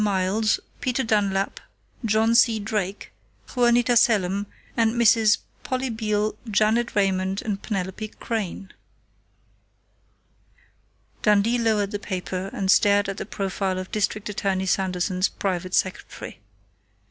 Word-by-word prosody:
Miles, 205 Hz, +2 st, +1 dB, 0.2 s
Peter 255 Hz, +1 st, -1 dB
Dunlap, 200 Hz, -3 st, 0 dB, 0.4 s
John 220 Hz, +1 st, +2 dB
C. 230 Hz, -2 st, +4 dB
Drake, 205 Hz, -2 st, -3 dB, 0.4 s
Juanita 240 Hz, 0 st, +3 dB
Selim, 205 Hz, -4 st, +3 dB, 0.3 s
and 230 Hz, 0 st, +2 dB
Misses 225 Hz, -2 st, +5 dB, 0.3 s
Polly 260 Hz, -1 st, -2 dB
Beale, 215 Hz, -1 st, -1 dB, 0.2 s
Janet 220 Hz, +3 st, +2 dB
Raymond, 190 Hz, -1 st, +1 dB
and 205 Hz, -2 st, -3 dB
Penelope 195 Hz, 0 st, -3 dB
Crain." 200 Hz, -4 st, -4 dB, 2.5 s
Dundee 210 Hz, +3 st, +3 dB
lowered 215 Hz, -3 st, +1 dB
the 205 Hz, -, -3 dB
paper 185 Hz, -1 st, -4 dB
and 190 Hz, -1 st, +1 dB
stared 205 Hz, 0 st, +4 dB
at 195 Hz, -, -4 dB
the -, -, -5 dB
profile 195 Hz, -2 st, -2 dB
of 185 Hz, 0 st, -6 dB
District 210 Hz, 0 st, -1 dB
Attorney 195 Hz, -2 st, -1 dB
Sanderson's 185 Hz, 0 st, 0 dB
private 185 Hz, -2 st, -2 dB
secretary. 185 Hz, -, -3 dB
205 Hz, 110 wpm, -24 LUFS, 190-225 Hz, 2.5 s, Misses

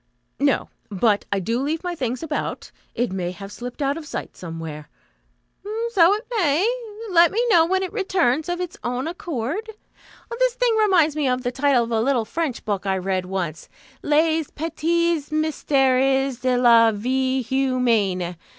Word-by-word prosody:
"No. 280 Hz, -1 st, +1 dB, 0.2 s
But 205 Hz, +1 st, +1 dB
I 200 Hz, -, +1 dB
do 230 Hz, +7 st, -1 dB
leave 310 Hz, +5 st, -2 dB
my 355 Hz, -1 st, -2 dB
things 255 Hz, -3 st, -3 dB
about. 310 Hz, -2 st, -4 dB, 0.2 s
It 245 Hz, -2 st, -1 dB
may 185 Hz, -2 st, -2 dB
have 195 Hz, +2 st, -9 dB
slipped 245 Hz, +6 st, -6 dB
out 280 Hz, +2 st, 0 dB
of 315 Hz, -2 st, -8 dB
sight -, -, -6 dB
somewhere." 160 Hz, -3 st, -7 dB, 1.0 s
"So 370 Hz, -3 st, +5 dB
it 430 Hz, +3 st, -7 dB
may. 345 Hz, -1 st, +2 dB, 0.4 s
Let 340 Hz, -1 st, +6 dB
me 435 Hz, -, -1 dB
know 330 Hz, -6 st, +5 dB
when 380 Hz, +1 st, +1 dB
it 375 Hz, -, -5 dB
returns 350 Hz, -, +1 dB
of 350 Hz, 0 st, -2 dB
its 360 Hz, -2 st, -5 dB
own 250 Hz, +4 st, -2 dB
accord. 335 Hz, -, -4 dB, 0.7 s
This -, -, +2 dB
thing -, -, +2 dB
reminds 370 Hz, -8 st, +3 dB
me 300 Hz, -3 st, 0 dB
of 250 Hz, 0 st, 0 dB
the 245 Hz, -, -1 dB
title 270 Hz, -2 st, +2 dB
of 230 Hz, -, -6 dB
a 225 Hz, -1 st, +1 dB
little 245 Hz, -2 st, +1 dB
French 300 Hz, +1 st, -3 dB
book 205 Hz, -2 st, -2 dB
I 190 Hz, 0 st, +1 dB
read 185 Hz, 0 st, -2 dB
once: 175 Hz, -5 st, -4 dB, 0.3 s
Les 315 Hz, +1 st, +2 dB
Petits 330 Hz, 0 st, -1 dB
Mysteres 270 Hz, -4 st, +1 dB
de 255 Hz, -1 st, +1 dB
la 230 Hz, -2 st, +6 dB
Vie 260 Hz, +4 st, 0 dB
Humaine. 230 Hz, -9 st, 0 dB
265 Hz, 165 wpm, -22 LUFS, 230-330 Hz, 1.0 s, Let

